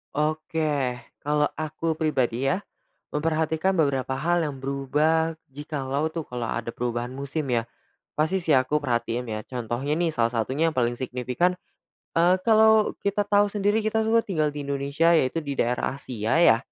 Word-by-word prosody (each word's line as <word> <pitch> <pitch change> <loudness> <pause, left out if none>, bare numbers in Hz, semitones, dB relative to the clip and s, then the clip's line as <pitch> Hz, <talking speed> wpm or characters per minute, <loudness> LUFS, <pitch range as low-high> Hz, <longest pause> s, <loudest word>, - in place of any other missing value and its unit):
Oke, 150 -3 0 0.2
kalau 150 0 +2
aku 155 +1 -2
pribadi 135 -5 0
ya, 195 +8 -1 0.5
memperhatikan 160 +4 0
beberapa 135 -4 +1
hal 170 +5 +1
yang 145 -4 -3
berubah. 150 +4 0 0.2
Jikalau 145 0 -2
tuh 160 -1 -5
kalau 120 -2 -4
ada 115 0 -3
perubahan 120 +1 -3
musim 140 +3 -3
ya, 115 -1 0 0.4
pasti 160 +5 +1
sih 170 -4 +1
aku 130 +3 +3
perhatiin 120 -3 -1
ya. 110 - -3
Contohnya 125 +5 -3
nih, 170 -2 0
salah 115 -4 +2
satunya 130 +7 0
yang 155 - -10
paling 120 -1 +2
signifikan, 125 +8 -1 0.6
eee, 180 +2 +4
kalau 220 0 +5 0.2
kita 200 +1 +1
tahu 205 0 +3
sendiri 210 +1 +1
kita 220 +1 +1
tuh 225 +1 +2
tinggal 155 -6 0
di 145 -1 -6
Indonesia, 140 +4 +1
yaitu 160 +1 +1
di 140 - -2
daerah 125 -1 0
Asia 130 +2 -1
ya. 115 -9 +7
150 Hz, 160 wpm, -25 LUFS, 130-165 Hz, 0.6 s, ya